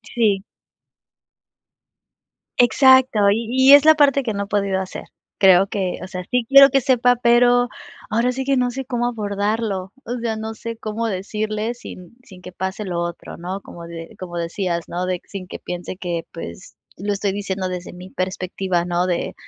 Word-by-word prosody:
Sí. 205 -5 +2 2.1
Exacto, 245 -3 +5
y 225 +2 -1
y 260 +2 +6
es 285 - +9
la 315 0 +7
parte 280 -2 +4
que 225 - -2
no 200 0 -2
he - - -8
podido 200 -2 0
hacer. 190 - -6 0.3
Creo 190 0 +6
que 190 -3 -2
o - - -6
sea, 185 -1 -6
sí 250 -2 +1
quiero 275 +1 +9
que 270 0 +2
sepa, 245 -1 +3
pero 245 0 +4 0.4
ahora 235 +3 +2
sí 265 +1 -4
que 275 0 +2
no 250 -1 +1
sé 265 +2 -5
cómo 240 -1 -1
abordarlo, 205 -3 -2
o 245 +1 -3
sea, 230 -1 -1
no 220 0 -5
sé 230 +1 -7
cómo 220 +1 -3
decirle 215 +3 -3
sin 185 -5 -12
sin 185 -6 -15
que 180 - -9
pase 190 +3 -4
lo 175 -2 -3
otro, 170 0 -6
¿no?, 185 +3 -5
como 170 -1 -11
de 165 -1 -9
como 175 -2 -6
decías, 170 0 -3
¿no?, 180 +1 -3
de 180 -1 -1
sin 190 -2 -8
que - - -7
piense 180 +1 -6
que 175 -3 -4
pues 85 - -9 0.2
lo 205 +2 -3
estoy 200 0 -1
diciendo 195 -2 -3
desde 180 -1 -6
mi 180 +1 -11
perspectiva, 185 -1 -2
¿no?, 175 +1 0
de 175 -2 -2
205 Hz, 185 wpm, -21 LUFS, 185-240 Hz, 2.1 s, es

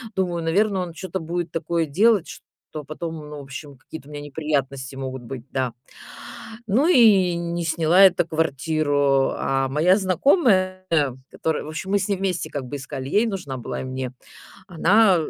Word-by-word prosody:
Думаю, 175 -3 -1
наверно, 195 +3 +1
он 175 -2 -5
чё-то 190 +2 -5
будет 170 0 -4
такое 165 -1 -1
делать, 205 +4 +3
что 150 - -11
потом, 160 +3 -6
ну, 150 -1 -8
в - - -7
общем, 140 +1 -9
какие-то 145 +2 -11
у - - -12
меня 145 - -6
неприятности 140 -3 -3
могут 130 -1 -5
быть, 120 -1 -7
да. 130 -3 -2 0.9
Ну 245 - +2
и 205 - +5
не 170 0 -3
сняла 165 +3 +4
эту 175 -2 +2
квартиру. 145 -3 +1
А 135 0 0
моя 170 +8 +3
знакомая, 185 - +2 0.4
которая, 160 -1 -2
в 150 - -8
общем, 165 +5 -5
мы 205 - +3
с 190 - -2
ней 200 - +1
вместе 185 -2 -2
как 140 -2 -4
бы 125 +3 -6
искали, 135 0 -6
ей 215 +3 +3
нужна 180 - -4
была 120 - -5
и - - -6
мне. 130 -1 -5 0.5
Она 190 +3 +4
160 Hz, 175 wpm, -23 LUFS, 140-185 Hz, 0.9 s, и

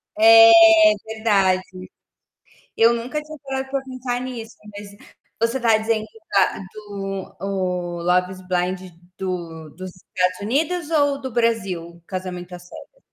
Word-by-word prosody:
É, 225 +1 +8 0.6
verdade. 200 -4 +2 1.2
Eu 230 +1 +5
nunca 245 +6 -4
tinha 305 0 -11
parado 265 -1 -4
pra 275 0 -2
pensar 255 -2 -4
nisso, 235 -3 -7 0.2
mas 205 0 -10 0.4
você 230 +3 0
tá 230 -3 +3
dizendo 220 0 -1 0.3
da 190 -2 +2
do 195 -2 -7
o 180 -3 -3
Love 180 +1 +1
is 185 0 -10
Blind 180 0 -1 0.4
do 170 -4 -5
dos 185 +1 -8
Estados 180 0 -2
Unidos 300 - -1
ou 285 -3 +2
do 260 -1 -6
Brasil, 190 -8 -2
Casamento 180 -1 -6
à 180 - -8
Cega? 180 - -14
205 Hz, 135 wpm, -21 LUFS, 185-245 Hz, 1.2 s, É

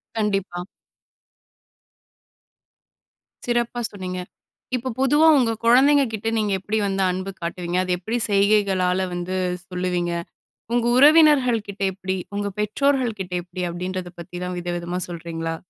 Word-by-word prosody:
கண்டிப்பா. 195 -5 -1 2.8
சிறப்பா 240 0 0
சொன்னீங்க. 185 -2 -5 0.6
இப்ப 250 +1 -3
பொதுவா 295 +4 +4
உங்க 230 -2 +2
குழந்தைங்க 275 +4 +6
கிட்ட 220 +1 -4
நீங்க 210 -2 0
எப்படி 210 +3 -2
வந்து 195 0 0
அன்பு 185 +2 -4
காட்டுவீங்க. 175 +1 -3
அது 185 - -3
எப்படி 220 +6 -2
செய்கைகளால 195 -2 +2
வந்து 175 +1 -3 0.3
சொல்லுவீங்க. 180 -1 -1 0.6
உங்க 240 -1 +2
உறவினர்கள் 285 -6 +6
கிட்ட 200 0 -9
எப்படி? 190 0 -3 0.2
உங்க 205 0 -1
பெற்றோர்கள் 245 +1 +1
கிட்ட 180 -1 -5
எப்படி? 180 +1 -7
அப்படின்றதப்பத்திலாம் 180 0 -5
விதவிதமா 175 0 -3
சொல்றீங்களா? 165 -1 -4
195 Hz, 110 wpm, -23 LUFS, 180-230 Hz, 2.8 s, குழந்தைங்க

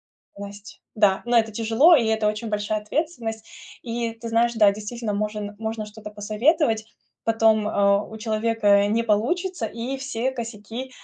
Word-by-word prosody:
ответственность, 200 +1 -12
да. 205 -3 +3
Ну 240 0 +1
это 225 -1 +3
тяжело, 230 +10 +5
и 235 - +1
это 220 -1 +1
очень 215 +2 -3
большая 210 0 -1
ответственность. 225 -4 -3 0.3
И, 235 -1 -3
ты 230 0 -8
знаешь, 230 +1 +2
да, 210 -3 +5
действительно, 215 +2 -5
можн 210 0 -3
можно 220 -1 -4
что-то 210 0 -10
посоветовать, 220 +3 +1 0.4
потом, 220 -1 +3
э, 200 -1 +3
у - - -7
человека 215 -2 +2
не 225 +3 +1
получится, 285 - 0
и 235 +5 -4
все 265 -1 -2
косяки 230 +1 -6
220 Hz, 150 wpm, -24 LUFS, 210-235 Hz, 0.4 s, тяжело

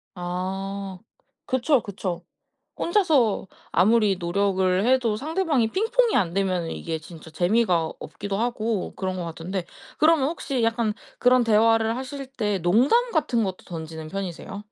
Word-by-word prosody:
아 190 +2 -4 0.5
그쵸, 260 0 +2
그쵸. 185 -4 -4 0.6
혼자서 310 - +2 0.3
아무리 210 +1 +4
노력을 185 +2 +1
해도 250 -4 +3
상대방이 305 - 0
핑퐁이 455 - +2
안 175 -4 +1
되면은 185 -3 0
이게 165 -1 -4
진짜 160 0 -12
재미가 175 -1 +1
없기도 200 -1 -5
하고 225 -3 -1
그런 185 -1 -2
것 180 - -3
같은데 170 +2 -5 0.3
그러면 310 -3 +4
혹시 275 -6 -2
약간 230 -1 +1 0.2
그런 250 0 +4
대화를 225 +1 +3
하실 275 +1 -6
때 215 -7 -2
농담 255 - +3
같은 245 - +1
것도 190 -2 -5
던지는 160 -2 -7
편이세요? 195 +1 -5
205 Hz, 300 characters per minute, -24 LUFS, 185-250 Hz, 0.6 s, 아무리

